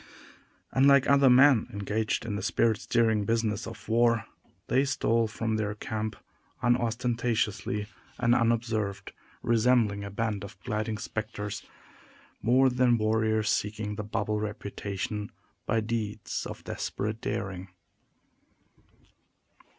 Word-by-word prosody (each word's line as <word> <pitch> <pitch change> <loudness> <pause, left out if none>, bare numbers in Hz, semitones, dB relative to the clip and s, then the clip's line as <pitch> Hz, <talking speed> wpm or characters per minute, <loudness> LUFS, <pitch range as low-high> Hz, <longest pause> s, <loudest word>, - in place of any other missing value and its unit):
Unlike 140 0 +5
other 140 -1 +6
men 130 -1 +6
engaged 105 +2 -1
in 105 -3 -3
the 100 - -3
spirit 110 +2 +2
stirring 110 -4 +2
business 110 0 0
of 115 -2 -10
war, 115 -1 +3 0.4
they 130 +2 +2
stole 115 -5 +1
from 110 0 -2
their 105 -1 -2
camp 110 0 -4 0.5
unostentatiously 120 -3 0 0.3
and 120 -1 +3
unobserved 110 -4 0 0.3
resembling 115 -3 +3
a 100 - -5
band 105 0 -2
of 100 +1 -10
gliding 110 +1 -2
specters, 105 -2 -4 0.8
more 130 +3 +4
than 125 -1 +3
warriors 110 0 +1
seeking 105 0 -2
the 105 - -4
bubble 105 0 -1
reputation 105 0 -4 0.4
by 115 - +2
deeds 110 -2 -3
of - - -8
desperate 110 +2 -4
daring. 95 -1 -3
110 Hz, 110 wpm, -28 LUFS, 105-115 Hz, 0.8 s, other